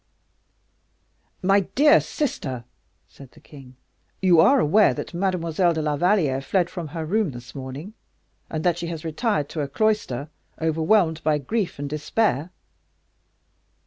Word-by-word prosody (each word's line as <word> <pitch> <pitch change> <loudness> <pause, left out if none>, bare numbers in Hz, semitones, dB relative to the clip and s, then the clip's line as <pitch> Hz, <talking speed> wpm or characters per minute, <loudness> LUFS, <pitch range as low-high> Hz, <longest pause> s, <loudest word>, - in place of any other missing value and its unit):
"My 195 +2 +4
dear 285 - +4
sister," 130 - -3 0.4
said 135 -2 -15
the - - -17
king, 135 -4 -15 0.4
"you 180 -3 +4
are 270 +12 +6
aware 210 +2 +4
that - - -6
Mademoiselle 175 -1 0
de 160 - -1
la 150 -1 0
Valliere 155 -5 +2
fled 175 +5 0
from 175 -4 -5
her 165 +2 -6
own - - -6
room 215 -1 +1
this 120 -1 -11
morning, 135 +9 -7 0.6
and 155 -1 -4
that 175 -1 +1
she 170 - -4
has 165 -1 -6
retired 160 - -1
to 155 - -4
a 140 - -2
cloister, 155 - -1 0.3
overwhelmed 160 +1 +2
by 155 -1 +2
grief 190 - -2
and 145 0 -4
despair." 150 - -1
165 Hz, 145 wpm, -23 LUFS, 145-195 Hz, 0.6 s, are